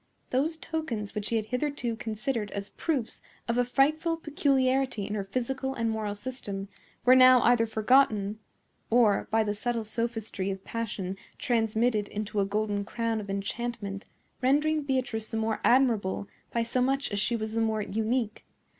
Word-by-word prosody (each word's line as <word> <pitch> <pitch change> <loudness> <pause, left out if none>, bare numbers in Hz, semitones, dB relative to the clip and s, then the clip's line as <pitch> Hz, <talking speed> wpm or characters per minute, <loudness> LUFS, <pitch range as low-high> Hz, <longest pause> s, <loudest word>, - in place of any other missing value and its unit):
Those 300 +6 +1
tokens 265 -12 -4
which 210 0 -3
he 230 - 0
had 220 -1 0
hitherto 250 -1 -2
considered 220 0 -2
as 200 0 -4
proofs 280 -9 -2 0.3
of 235 +1 +1
a - - +5
frightful 310 +6 +2
peculiarity 270 -7 +1
in 210 - -4
her 205 -2 -1
physical 265 +6 -2
and 230 -2 0
moral 215 -2 -2
system 205 -4 -6 0.4
were 250 - +8
now 255 0 +8
either 235 -1 +4
forgotten, 220 -2 +3 0.5
or, 225 -4 +4
by 225 0 +3
the 205 -1 -1
subtle 230 +2 -2
sophistry 220 -3 -2
of 195 0 -4
passion 200 -5 -4 0.2
transmitted 225 -2 +1
into 210 0 -3
a 195 - +3
golden 205 0 -1
crown 230 +1 -2
of 200 - -9
enchantment, 200 0 -3 0.4
rendering 300 +4 +3
Beatrice 255 -6 -1
the 225 - -3
more 220 -1 -1
admirable 225 -7 +3 0.2
by 235 - +1
so 240 +2 0
much 270 +1 +1
as 205 - -1
she 210 +4 +1
was 220 -1 -3
the 225 - +1
more 220 -1 +1
unique. 220 +2 -1
230 Hz, 165 wpm, -28 LUFS, 210-255 Hz, 0.5 s, were